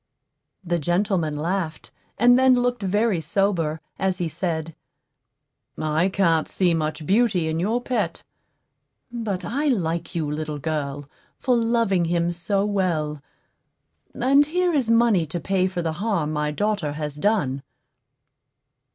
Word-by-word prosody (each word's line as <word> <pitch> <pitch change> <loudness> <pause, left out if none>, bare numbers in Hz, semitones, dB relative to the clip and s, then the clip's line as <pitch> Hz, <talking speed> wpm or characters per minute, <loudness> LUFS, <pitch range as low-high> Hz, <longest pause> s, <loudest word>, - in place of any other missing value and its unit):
'" - - -54
The 175 - +2
gentleman 175 -1 0
laughed, 165 0 -3 0.3
and 245 +2 +6
then 260 0 +5
looked 245 -1 0
very 205 -1 +1
sober, 165 -2 0 0.2
as 190 -1 0
he 175 -3 -1
said, 160 -1 -3 1.0
"I 155 +4 +1
can't 170 -5 +2
see 180 -3 +1
much 155 -1 -2
beauty 200 -3 +2
in 160 +1 -1
your 215 +7 +1
pet; 250 - -2 0.9
but 220 -6 -3
I 285 +6 -1
like 170 - -1
you, 165 -2 0
little 150 0 -3
girl, 145 -2 -3 0.3
for 255 -2 +1
loving 230 -6 +2
him 170 0 0
so 195 +4 -1
well; 165 -8 -1 0.9
and 275 +4 +4
here 355 +2 +1
is 265 -6 +1
money 230 -7 +3
to 175 - -4
pay 185 +2 +1
for 180 -2 -3
the 160 -1 -1
harm 175 -4 -1
my 150 0 0
daughter 195 -2 -1
has 150 -1 -4
done." 150 -8 0
180 Hz, 140 wpm, -23 LUFS, 160-215 Hz, 1.0 s, and